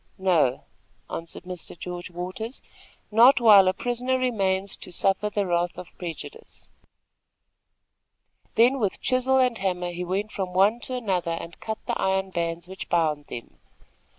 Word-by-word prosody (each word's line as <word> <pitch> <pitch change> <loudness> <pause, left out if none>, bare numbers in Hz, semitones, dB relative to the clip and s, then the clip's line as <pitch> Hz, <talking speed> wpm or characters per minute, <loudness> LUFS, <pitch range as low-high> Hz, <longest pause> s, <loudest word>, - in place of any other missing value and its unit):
"No," 165 -9 +2 0.5
answered 165 +1 -7
Mr. 180 -1 -7
George 175 +1 -6
Waters; 185 +8 -6 0.5
"not 240 +6 +7
while 210 -5 +8
a 185 - +3
prisoner 245 +4 -1
remains 200 -6 0
to - - -8
suffer 195 +3 +1
the 205 -1 -1
wrath 175 -1 0
of 180 - -10
prejudice." 185 - -8 1.8
Then 250 +4 +5
with 205 -5 -1
chisel 255 +1 +2
and 250 -3 +2
hammer 180 -2 -1
he 175 +1 -4
went 195 +4 -2
from 185 -3 -4
one 200 +5 +4
to 255 - -2
another 180 -8 -1
and 170 - -9
cut 220 0 -4
the - - -2
iron 190 0 0
bands 170 0 -3
which 190 +1 -8
bound 155 -4 +1
them. 120 - -9
190 Hz, 150 wpm, -25 LUFS, 175-225 Hz, 1.8 s, while